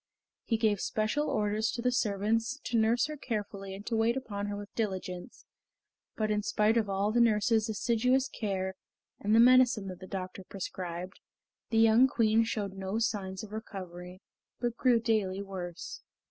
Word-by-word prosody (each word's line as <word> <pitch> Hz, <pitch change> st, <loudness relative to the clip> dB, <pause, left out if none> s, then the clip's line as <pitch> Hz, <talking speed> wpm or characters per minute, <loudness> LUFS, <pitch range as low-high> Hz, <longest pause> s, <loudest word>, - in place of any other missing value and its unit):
He 225 Hz, -, +1 dB
gave 215 Hz, -3 st, +1 dB
special 215 Hz, +8 st, 0 dB
orders 210 Hz, +1 st, 0 dB
to 235 Hz, -, -3 dB
the 250 Hz, -, +3 dB
servants 225 Hz, +3 st, 0 dB
to 235 Hz, -, -3 dB
nurse 230 Hz, +2 st, +3 dB
her 305 Hz, 0 st, -5 dB
carefully 200 Hz, -6 st, -4 dB
and 200 Hz, +2 st, -10 dB
to 230 Hz, -, -1 dB
wait 225 Hz, +3 st, +2 dB
upon 205 Hz, -6 st, -4 dB
her 205 Hz, -, -3 dB
with 205 Hz, 0 st, -9 dB
diligence, 185 Hz, -4 st, -4 dB, 0.7 s
but 215 Hz, -1 st, 0 dB
in 210 Hz, 0 st, +1 dB
spite 210 Hz, +1 st, +2 dB
of 220 Hz, -3 st, +1 dB
all 195 Hz, +2 st, +1 dB
the 240 Hz, +2 st, +3 dB
nurses' 220 Hz, 0 st, +3 dB
assiduous 250 Hz, +5 st, +2 dB
care 190 Hz, -6 st, -3 dB, 0.5 s
and 210 Hz, +2 st, +2 dB
the -, -, +6 dB
medicine 245 Hz, -4 st, +5 dB
that 185 Hz, -, -8 dB
the 185 Hz, -, -10 dB
doctor 185 Hz, 0 st, -5 dB
prescribed, 185 Hz, -1 st, -6 dB, 0.5 s
the 225 Hz, -, 0 dB
young 225 Hz, +3 st, +6 dB
Queen 225 Hz, -2 st, +3 dB
showed 210 Hz, -3 st, -3 dB
no 190 Hz, +2 st, -3 dB
signs 200 Hz, -4 st, -2 dB
of 210 Hz, -, -9 dB
recovery, 185 Hz, -3 st, -8 dB, 0.4 s
but 240 Hz, -1 st, -1 dB
grew 245 Hz, -1 st, +3 dB
daily 210 Hz, -4 st, 0 dB
worse. 180 Hz, -3 st, -7 dB
215 Hz, 170 wpm, -30 LUFS, 195-230 Hz, 0.7 s, the